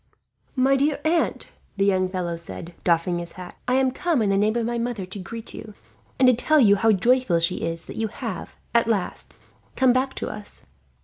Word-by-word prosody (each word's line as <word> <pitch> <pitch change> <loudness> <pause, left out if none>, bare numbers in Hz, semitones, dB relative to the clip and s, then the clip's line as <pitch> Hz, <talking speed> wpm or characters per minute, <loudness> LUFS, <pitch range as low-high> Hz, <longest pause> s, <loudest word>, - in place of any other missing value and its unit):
"My 265 +1 +4
dear 285 +2 +1
aunt," 325 +1 0 0.3
the 195 - +2
young 185 -2 +2
fellow 180 -2 -2
said, 170 +1 -9
doffing 175 0 +1
his 170 0 -7
cap, 180 -1 -10
"I 250 - +2
am 260 -1 +3
come 320 -3 0
in 200 - +1
the - - +2
name 210 +3 +2
of 235 - 0
my 235 0 -1
mother 230 -5 -3
to 190 +2 -8
greet 225 +4 -8
you, 215 -2 -9 0.4
and 260 - +5
to 255 - +7
tell 305 +6 +3
you 205 -6 +6
how 220 +3 +3
joyful 235 -3 +3
she 165 - 0
is 165 0 -4
that - - -9
you 225 - 0
have, 215 -4 -6 0.2
at 235 -1 +3
last, 210 -5 -2 0.4
come 260 -2 +4
back 265 +1 0
to - - -4
us. 210 -1 -9
220 Hz, 210 wpm, -24 LUFS, 185-255 Hz, 0.4 s, to